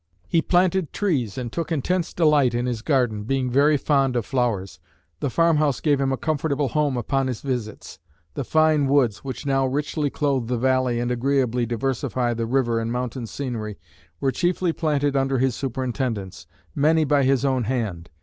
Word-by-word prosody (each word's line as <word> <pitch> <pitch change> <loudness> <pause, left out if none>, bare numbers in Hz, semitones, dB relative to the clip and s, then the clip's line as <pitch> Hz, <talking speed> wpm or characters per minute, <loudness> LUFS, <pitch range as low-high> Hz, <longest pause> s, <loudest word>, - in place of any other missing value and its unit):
He 165 - +2
planted 180 -1 +1
trees 140 - -1
and 120 -3 -4
took 170 +3 -4
intense 170 +3 0
delight 150 -7 +3
in 120 +1 0
his 120 -3 -2
garden, 120 -6 +1
being 130 +2 -1
very 145 +3 +4
fond 135 -3 +1
of 120 -3 0
flowers. 105 -10 -1 0.4
The 140 - -1
farmhouse 155 -2 +2
gave 145 -3 +1
him 135 -1 +1
a 135 - 0
comfortable 145 -2 -1
home 145 -1 0
upon 135 +2 0
his 125 -4 -4
visits. 120 -6 -5 0.3
The 140 - -3
fine 155 0 +3
woods 130 -7 +2
which 130 0 -7
now 135 -1 +2
richly 145 +2 -1
clothe 135 -5 -1
the 125 0 -1
valley 130 -1 +1
and 120 0 -1
agreeably 125 -1 +1
diversify 120 0 -1
the 115 0 -3
river 120 -2 +1
and 115 0 -3
mountain 125 -1 -3
scenery 110 -6 -5 0.4
were 135 - +1
chiefly 175 +2 0
planted 145 -4 0
under 135 0 +1
his 130 0 +1
superintendence, 120 - -3 0.3
many 155 - +3
by 145 -1 +2
his 135 0 +2
own 130 -3 +1
hand. 105 -9 -3
135 Hz, 175 wpm, -23 LUFS, 120-145 Hz, 0.4 s, very